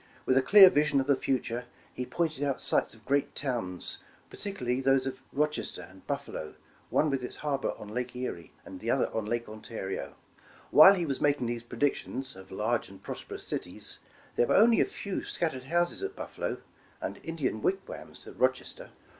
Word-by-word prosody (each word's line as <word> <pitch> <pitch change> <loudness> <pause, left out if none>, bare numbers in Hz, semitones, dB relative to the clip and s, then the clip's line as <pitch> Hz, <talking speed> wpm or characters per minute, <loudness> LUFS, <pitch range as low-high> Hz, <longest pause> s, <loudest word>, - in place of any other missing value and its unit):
With 130 - +3
a 135 - +6
clear 190 +6 +9
vision 145 -1 +3
of 135 - 0
the 140 0 +4
future, 125 -2 -1 0.3
he 125 - -4
pointed 155 -4 -1
out 140 -2 0
sites - - +3
of 110 - -21
great 140 +1 +1
towns, 115 -10 -2 0.3
particularly 135 -11 -2
those 135 0 +3
of 130 -1 -4
Rochester 150 +1 -1
and - - -18
Buffalo, 75 - -4 0.3
one 150 -1 +2
with 135 -2 -1
its 125 - -3
harbor 140 -3 0
on 105 - -9
Lake 125 +3 -4
Erie, 125 -9 -5
and - - -9
the - - -4
other - - +1
on 110 -2 -2
Lake 120 +1 -1
Ontario. 105 -2 -6 0.6
While 190 +6 +10
he 175 -3 -1
was 140 -4 -2
making 145 -3 +2
these 120 0 -2
predictions 130 0 -2
of 95 0 -12
large 110 +2 -1
and 95 0 -14
prosperous - - -7
cities, - - -5 0.4
there 120 - +4
were - - +3
only 230 +2 +6
a - - +4
few 200 -2 -4
scattered 130 -7 -2
houses 175 - +1
at 395 +1 -4
Buffalo, - - -4 0.4
and - - -5
Indian 145 -9 -2
wigwams 190 - -3
at - - -12
Rochester. - - 0
135 Hz, 180 wpm, -30 LUFS, 120-155 Hz, 0.6 s, While